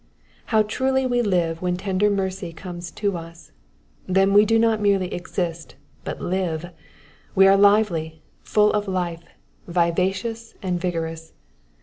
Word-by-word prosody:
How 220 -2 +3
truly 265 +5 0
we 245 -1 +1
live 175 -6 0
when 180 -1 -1
tender 195 +2 +1
mercy 190 -3 -2
comes 175 0 -7
to 200 -3 -2
us. 165 -1 -11 0.6
Then 195 +1 +3
we 205 +1 +7
do 225 +1 +3
not 225 -1 +2
merely 195 -3 +1
exist, 175 -2 -4 0.3
but - - -5
live; 175 -2 -2 0.6
we 195 - +6
are 195 - +6
lively, 195 -6 +2 0.2
full 210 0 +2
of 210 -1 -1
life, 175 -3 -2 0.5
vivacious, 190 +6 -1
and 180 -2 -1
vigorous. 165 -2 -4
185 Hz, 135 wpm, -23 LUFS, 170-210 Hz, 0.6 s, we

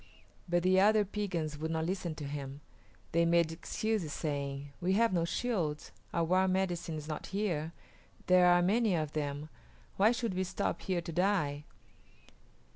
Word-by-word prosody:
But 175 0 +2
the 185 +1 +4
other 210 +1 +5
Piegans 175 -7 -3
would 160 +1 -2
not 160 0 -1
listen 180 -2 -2
to 155 - -7
him; 140 0 -6 0.5
they 170 +1 +3
made 170 -1 +3
excuses, 185 +1 -2
saying, 140 -2 -3
"We 180 +2 +2
have 225 +1 +3
no 170 -2 +2
shields; 170 -7 -2 0.2
our 170 - +1
war 185 +3 +3
medicine 180 -3 -1
is 150 0 -7
not 155 -1 -5
here; 175 -6 -1 0.5
there 180 0 +6
are 175 0 +5
many 210 +1 +3
of 155 -2 -2
them; 145 0 -3 0.5
why 210 +4 +5
should 235 -4 -1
we 185 +1 0
stop 185 +1 -2
here 180 -2 -1
to 170 - -6
die?" 165 -5 0
175 Hz, 165 wpm, -32 LUFS, 155-190 Hz, 0.5 s, there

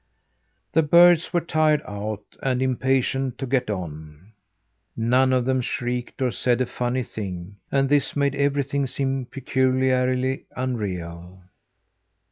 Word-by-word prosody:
The 160 - +4
birds 170 +2 +5
were 175 -1 +1
tired 155 -2 +2
out 105 0 -5 0.2
and 130 -2 0
impatient 130 0 0
to 135 - -4
get 125 -2 0
on. 80 -1 -7 0.7
None 125 +3 +3
of 125 -2 +2
them 130 0 +1
shrieked 125 +2 -3
or 125 - +1
said 120 0 +1
a 130 - +2
funny 125 +1 -2
thing, 100 -3 -7
and 135 0 +2
this 145 0 +1
made 140 -1 +1
everything 140 -1 0
seem 135 0 -2
peculiarly 130 0 +1
unreal. 90 -8 -4
130 Hz, 125 wpm, -24 LUFS, 115-135 Hz, 0.7 s, birds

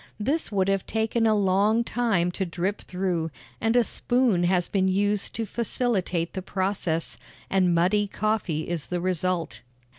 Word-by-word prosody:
This 280 +9 -1
would 195 -2 +1
have 195 -1 0
taken 225 +1 +1
a 215 - +4
long 205 +4 +3
time 220 -8 +1
to 190 - -2
drip 185 +3 -2
through, 180 -3 -2 0.3
and 225 +2 +2
a 245 - +6
spoon 240 -8 +1
has 180 -1 +2
been 190 -2 +1
used 205 +2 0
to 225 - -1
facilitate 200 -6 -1
the 190 - -3
process, 185 -4 -1 0.3
and 185 -3 +3
muddy 195 +5 +2
coffee 200 -7 -1
is 170 -4 -3
the 180 - -2
result. 180 -1 -1
195 Hz, 155 wpm, -26 LUFS, 180-220 Hz, 0.3 s, a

